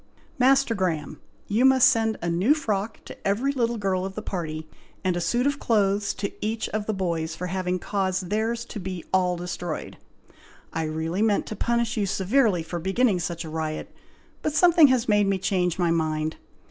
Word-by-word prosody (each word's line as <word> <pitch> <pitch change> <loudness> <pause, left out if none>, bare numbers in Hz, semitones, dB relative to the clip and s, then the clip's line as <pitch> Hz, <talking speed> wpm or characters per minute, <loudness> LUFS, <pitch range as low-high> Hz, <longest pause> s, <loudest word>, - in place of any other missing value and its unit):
"Master 265 -1 +4
Graham! 160 -7 -2 0.3
you 215 +4 +2
must 265 0 +7
send 225 -4 +2
a - - -1
new 195 - +3
frock 220 -7 -3
to - - -7
every 230 +8 +1
little 235 -3 0
girl 190 -3 0
of 190 0 -5
the 215 - -5
party, 155 -5 -4 0.4
and 185 -2 +1
a 175 - -1
suit 240 +9 +1
of 285 0 0
clothes 200 -2 +1
to 200 0 -3
each 220 +1 -1
of 210 0 -3
the 220 - 0
boys, 165 -4 -2
for 180 - -5
having 185 0 -1
caused 190 -1 -2
theirs 225 +2 -1
to 220 - -7
be 185 -2 -6
all 180 -1 +2
destroyed. 175 -2 -5 0.8
I 160 - -1
really 160 +4 -2
meant 215 -2 +2
to 215 - -6
punish 235 +2 0
you 205 -2 +1
severely 195 -1 +2
for 170 +2 -5
beginning 195 +3 +2
such 170 0 -4
a - - -7
riot, 155 -1 -4 0.5
but 305 - -1
something 335 -2 +7
has 255 -2 +2
made 205 -2 +3
me 195 -1 +2
change 180 -2 0
my 175 -2 +2
mind. 155 -1 -1
195 Hz, 190 wpm, -25 LUFS, 175-230 Hz, 0.8 s, must